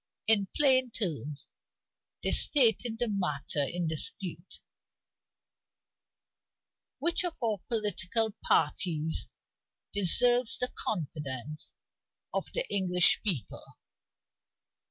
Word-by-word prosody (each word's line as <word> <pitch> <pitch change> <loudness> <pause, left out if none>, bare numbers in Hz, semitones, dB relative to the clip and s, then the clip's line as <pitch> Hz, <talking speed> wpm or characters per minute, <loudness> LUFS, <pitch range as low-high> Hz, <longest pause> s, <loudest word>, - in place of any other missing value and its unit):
In 215 -3 +2
plain 260 -3 +5
terms, 150 -10 -3 0.8
they - - +3
stated 240 -4 +3
the 240 +1 -1
matter 150 -8 -2
in 170 +4 -3
dispute: 165 +2 -4 2.4
"Which 340 +1 0
of 350 -2 -4
our 220 -5 -1
political 215 0 -1
parties 160 -4 0 0.7
deserves 240 +5 +3
the 250 - -2
confidence 150 - -5 0.6
of - - -2
the - - -2
English 180 -3 +4
people?" 175 - -1
200 Hz, 85 wpm, -29 LUFS, 160-235 Hz, 2.4 s, plain